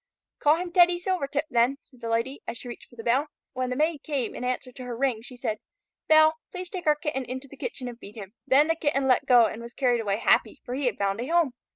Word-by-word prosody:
"Call 300 +1 +5
him 350 +1 -4
Teddy 350 0 +5
Silvertip 320 -5 -1
then," 240 +3 +3
said 255 -3 -22
the 230 - -4
Lady, 230 +5 -1
as 235 - -4
she 245 - -8
reached 240 - -9
for - - -18
the 225 - -8
bell. 260 +6 +2 0.3
When 255 -1 -2
the 250 - -2
Maid 305 +1 0
came 280 -5 -2
in - - -6
answer 255 0 -2
to 255 - -9
her 240 -2 -5
ring, 255 -4 0
she 250 +1 -10
said, 220 -3 -2 0.5
"Belle, 315 0 +6
please 365 -1 -7
take 360 -4 -5
our 300 - +5
Kitten 295 -3 -3
into 260 +2 -6
the - - -13
kitchen 265 - -5
and 240 -1 -8
feed 205 - -12
him." 200 -2 -9
Then 285 +3 +5
the 325 - +3
Kitten 290 -4 0
let 255 - +3
go 245 -2 +7
and 220 +1 -4
was 235 +1 -10
carried 245 -3 +2
away 200 -2 0
happy, - - +2
for 245 - -5
he 270 0 0
had 240 - -1
found 200 +2 -1
a 250 - -4
home. 330 -5 +2
260 Hz, 265 wpm, -26 LUFS, 240-305 Hz, 0.5 s, go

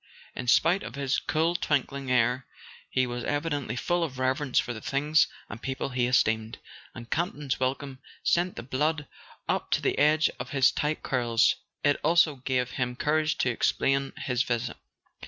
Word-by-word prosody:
In 125 - -5
spite 170 +10 +4
of 120 - -7
his 140 -1 0
cool 160 +2 0
twinkling 140 -4 -1
air 125 +1 +2 0.4
he 130 - +1
was 120 -1 -4
evidently 145 -5 -2
full 175 +7 0
of 140 -6 -4
reverence 130 +1 0
for 120 - +2
the 110 - -8
things 150 +5 +2 0.2
and 105 +3 -9
people 135 +1 -3
he 125 -2 0
esteemed, 110 -2 +1 0.4
and 120 -1 -10
Campton's 150 -5 -1
welcome 130 +1 -2 0.2
sent 175 +1 +1
the - - -6
blood 150 +4 -1 0.4
up - - -1
to - - +2
the - - 0
edge 155 +2 +4
of 125 +1 -5
his 135 -2 +4
tight 150 +1 -2
curls. 120 -3 +2 0.3
It 145 -1 +3
also 160 -2 +4
gave 125 -1 -1
him 125 -1 -2
courage 155 +3 +1
to 125 - +1
explain 135 +3 +1
his 125 -2 -1
visit. 120 -3 -2
135 Hz, 170 wpm, -27 LUFS, 125-150 Hz, 0.4 s, spite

